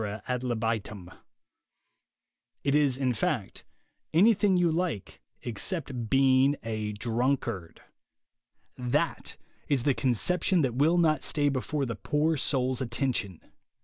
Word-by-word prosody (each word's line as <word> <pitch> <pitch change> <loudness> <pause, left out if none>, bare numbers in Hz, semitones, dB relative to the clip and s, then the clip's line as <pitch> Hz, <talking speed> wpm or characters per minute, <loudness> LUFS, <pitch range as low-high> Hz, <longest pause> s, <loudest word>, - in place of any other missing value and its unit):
ad 125 -1 -1
libitum 110 -6 -3 0.8
— 120 +1 -52
it 140 - +1
is, 145 -3 +3
in 130 -2 0
fact, 110 - -2 0.5
anything 200 0 +4
you 175 -2 +3
like 165 - -3 0.2
except 125 - -3
being 135 +1 +4
a 110 -1 -3
drunkard. 115 -5 -2 1.0
That 125 -1 -1 0.3
is 135 -4 +1
the 140 - +3
conception 165 - +1
that 130 -5 0
will 150 +7 +3
not 160 -3 +2
stay 145 -1 +1
before 140 +2 -2
the 120 - -3
poor 155 +2 0
soul's 130 -2 0
attention. 115 - -2
130 Hz, 115 wpm, -28 LUFS, 115-150 Hz, 1.0 s, anything